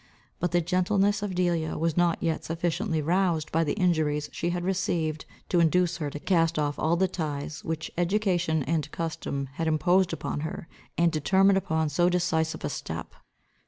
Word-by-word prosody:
But 175 - 0
the 175 0 +3
gentleness 195 +4 +1
of 200 -3 -3
Delia 175 -3 0
was 165 0 0
not 175 -1 +2
yet 165 -2 0
sufficiently 165 +1 -1
roused 170 -1 +1
by 165 +1 +2
the 150 - 0
injuries 155 -6 +1
she 170 - -2
had 175 0 -2
received, 170 -5 -1 0.2
to 175 - +3
induce 170 +1 +3
her, 150 -4 -3
to 145 - -7
cast 165 -1 +2
off 145 -1 -1
all 160 +2 +2
the 190 +2 +2
ties 150 -4 -4
which 160 -1 -4
education 175 -4 +1
and 150 +1 -1
custom 150 -4 -3
had 165 +2 -2
imposed 180 +4 +3
upon 165 - -3
her, 160 +2 -5 0.3
and 170 0 +3
determine 190 +5 +3
upon 160 -5 0
so 175 +4 +2
decisive 170 -3 0
a - - -1
step. - - -6
165 Hz, 175 wpm, -27 LUFS, 155-180 Hz, 0.3 s, the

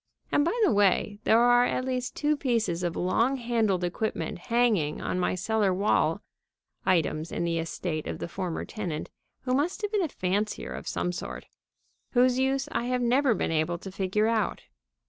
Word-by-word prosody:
And, 290 - +3
by 395 +10 0
the 395 - +4
way, 205 0 +2
there 220 - +5
are 245 0 +5
at 255 - -1
least 255 -1 -2
two 300 0 +1
pieces 230 - 0
of 175 -2 -2
long 230 +9 +1
handled 225 -7 0
equipment 185 +1 -2
hanging 220 -9 +1
on 185 - -2
my 180 - +1
cellar 205 +2 +1
wall 195 +3 +1 0.6
(items 165 -3 +1
in - - -2
the 170 -1 0
estate 165 -1 -3
of - - -4
the - - -5
former 180 -2 -4
tenant, 180 -9 -5 0.3
who 255 - -1
must 325 +10 0
have 415 - -1
been 420 -2 +1
a 345 - +1
fancier 205 -3 -2
of - - -7
some 180 - -1
sort) 180 - -6 0.7
whose 250 0 +4
use 270 +1 +1
I 235 - -1
have 250 0 0
never 250 0 +3
been - - -1
able 160 +2 0
to 190 +2 -9
figure 195 +3 0
out. 225 -1 0
215 Hz, 185 wpm, -27 LUFS, 180-250 Hz, 0.7 s, there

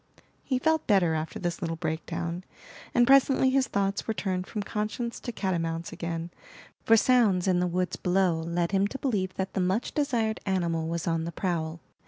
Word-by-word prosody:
He 260 - 0
felt 320 +4 +1
better 190 -6 +4
after 155 0 -3
this 175 +1 -3
little 165 -2 -2
breakdown, 170 +2 -3 0.5
and 240 -1 +4
presently 270 0 +5
his 265 -1 +2
thoughts 195 -2 -1
were 220 - -1
turned 185 -3 -2
from 210 -2 -4
conscience 215 +3 -3
to 240 - -5
catamounts 170 -5 -2
again; 170 0 -4 0.5
for 225 - +6
sounds 215 -7 +3
in 180 -1 +3
the 180 - +1
woods 180 +1 -1
below 180 -2 +2
led 170 +2 -1
him 195 0 +2
to 270 - -6
believe 200 -9 -1
that 190 0 -3
the 190 - 0
much 190 +6 0
desired 235 -7 0
animal 170 -4 0
was 165 -1 -3
on 165 -1 0
the 170 - -4
prowl. 165 -3 -2
185 Hz, 185 wpm, -28 LUFS, 170-220 Hz, 0.5 s, for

